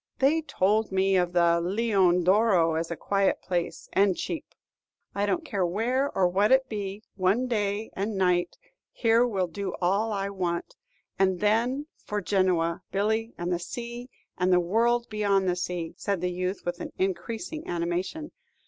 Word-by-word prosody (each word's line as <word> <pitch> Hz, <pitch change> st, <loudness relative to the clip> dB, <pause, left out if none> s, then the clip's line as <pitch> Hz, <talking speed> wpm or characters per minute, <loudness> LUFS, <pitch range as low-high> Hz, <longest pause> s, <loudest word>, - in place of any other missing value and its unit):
They 290 Hz, +5 st, +3 dB
told 215 Hz, -7 st, +1 dB
me 190 Hz, 0 st, +2 dB
of 180 Hz, -1 st, +1 dB
the 170 Hz, -1 st, +3 dB
'Leone 190 Hz, -2 st, +2 dB
d'Oro' 185 Hz, -3 st, +4 dB
as 165 Hz, +1 st, -2 dB
a 170 Hz, -, -3 dB
quiet 195 Hz, +3 st, +1 dB
place 175 Hz, -2 st, -3 dB
and 195 Hz, -2 st, +3 dB
cheap." -, -, -5 dB, 0.6 s
"I 200 Hz, +1 st, 0 dB
don't 330 Hz, -, -1 dB
care 200 Hz, -10 st, -1 dB
where 235 Hz, +10 st, 0 dB
or 185 Hz, -2 st, +4 dB
what 200 Hz, +5 st, +2 dB
it 265 Hz, 0 st, +4 dB
be; 205 Hz, -1 st, -5 dB
one 195 Hz, +7 st, +2 dB
day 210 Hz, -2 st, -1 dB
and 200 Hz, +1 st, -3 dB
night 180 Hz, -2 st, +1 dB, 0.3 s
here 230 Hz, +1 st, +3 dB
will 195 Hz, -5 st, 0 dB
do 190 Hz, +3 st, -5 dB
all 200 Hz, +5 st, +1 dB
I 200 Hz, -1 st, -2 dB
want. 175 Hz, -3 st, -3 dB, 0.4 s
And 190 Hz, -2 st, +2 dB
then 235 Hz, +7 st, +1 dB, 0.2 s
for 210 Hz, -, -2 dB
Genoa, 180 Hz, -4 st, +1 dB
Billy, 220 Hz, +4 st, 0 dB
and 175 Hz, +1 st, -2 dB
the 175 Hz, -, -1 dB
sea, 240 Hz, +6 st, -7 dB, 0.3 s
and 180 Hz, +1 st, +2 dB
the 180 Hz, -, +5 dB
world 235 Hz, +7 st, +1 dB
beyond 200 Hz, -3 st, +1 dB
the 180 Hz, -, +2 dB
sea," 175 Hz, -2 st, -3 dB
said 200 Hz, -3 st, -1 dB
the 180 Hz, +1 st, -1 dB
youth, 185 Hz, +2 st, -3 dB
with 175 Hz, 0 st, -3 dB, 0.2 s
increasing 220 Hz, -, -3 dB
animation. 175 Hz, -, -3 dB
195 Hz, 165 wpm, -27 LUFS, 180-225 Hz, 0.6 s, the